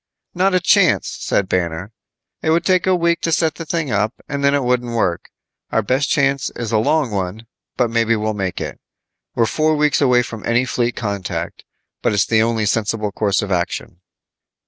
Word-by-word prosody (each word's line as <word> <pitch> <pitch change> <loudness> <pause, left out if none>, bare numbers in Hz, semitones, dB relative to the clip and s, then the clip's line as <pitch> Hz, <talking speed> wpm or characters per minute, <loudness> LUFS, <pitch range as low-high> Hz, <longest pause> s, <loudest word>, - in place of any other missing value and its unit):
"Not 185 +1 +2
a - - +4
chance," 190 0 +3
said 100 - 0
Banner. 90 +2 -2 0.5
It - - -1
would 170 +2 +2
take 185 -1 +2
a 185 - +4
week 170 -1 +1
to 165 - -1
set 160 -1 +2
the 165 0 -8
thing 160 -6 -2
up, 105 +1 0
and 140 -1 -3
then 140 0 +4
it 140 - 0
wouldn't 125 -1 0
work. 90 -6 -1 0.4
Our 110 - +1
best 130 +6 0
chance 140 -3 +1
is 115 -3 -4
a 110 - +3
long 140 +2 +1
one, 100 +3 -3 0.3
but 120 -2 +1
maybe 115 0 +2
we'll 110 0 -1
make 95 -3 -3
it. - - -6 0.6
We're 115 - +3
four 155 +6 +1
weeks 150 -1 +2
away 125 -3 +4
from 110 -3 -8
any 120 +2 +2
fleet 120 0 -1
contact, 100 -5 -4 0.4
but - - +1
it's 100 -2 +3
the 110 -1 +3
only 115 -1 +1
sensible 105 0 0
course 100 -1 0
of 100 - -5
action." 90 0 -3
115 Hz, 195 wpm, -19 LUFS, 105-150 Hz, 0.6 s, a